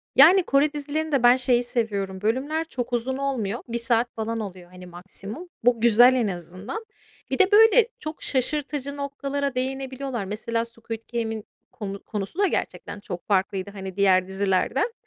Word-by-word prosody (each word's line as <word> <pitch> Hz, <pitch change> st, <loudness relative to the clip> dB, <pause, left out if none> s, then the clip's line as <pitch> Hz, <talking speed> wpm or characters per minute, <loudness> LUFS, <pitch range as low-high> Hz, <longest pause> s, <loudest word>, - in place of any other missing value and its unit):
Yani, 350 Hz, +8 st, +8 dB
Kore 290 Hz, 0 st, +2 dB
dizilerinde 295 Hz, -1 st, -1 dB
ben 245 Hz, +1 st, +8 dB
şeyi 250 Hz, -1 st, +2 dB
seviyorum: 200 Hz, -6 st, -2 dB
Bölümler 275 Hz, +9 st, 0 dB
çok 250 Hz, -5 st, -5 dB
uzun 250 Hz, +2 st, -1 dB
olmuyor. 245 Hz, -6 st, -2 dB
1 235 Hz, 0 st, -2 dB
saat 235 Hz, 0 st, +1 dB
falan 225 Hz, +1 st, -2 dB
oluyor, 185 Hz, -4 st, -8 dB
hani, 180 Hz, 0 st, -11 dB
maksimum. 195 Hz, -, -7 dB
Bu 240 Hz, -1 st, +3 dB
güzel 240 Hz, +2 st, +7 dB
en 245 Hz, -4 st, +1 dB
azından. 185 Hz, -, -6 dB, 0.5 s
Bir -, -, -1 dB
de, 385 Hz, +1 st, +5 dB
böyle, 445 Hz, +2 st, +7 dB
çok 310 Hz, +1 st, -6 dB
şaşırtıcı 280 Hz, +1 st, -1 dB
noktalara 280 Hz, -1 st, -3 dB
değinebiliyorlar. 265 Hz, -2 st, -3 dB
Mesela 230 Hz, +3 st, -2 dB
Squid 230 Hz, -1 st, -8 dB
Game'in 225 Hz, -2 st, -2 dB, 0.3 s
konu 200 Hz, -1 st, -6 dB
konusu 210 Hz, -, -5 dB
da 405 Hz, -, +4 dB
gerçekten 205 Hz, -, -3 dB
çok 180 Hz, -4 st, -7 dB
farklıydı, 195 Hz, 0 st, 0 dB
hani, 190 Hz, -2 st, -7 dB
diğer 185 Hz, -2 st, +4 dB
dizilerden. 195 Hz, -, 0 dB
235 Hz, 155 wpm, -25 LUFS, 200-275 Hz, 0.5 s, Yani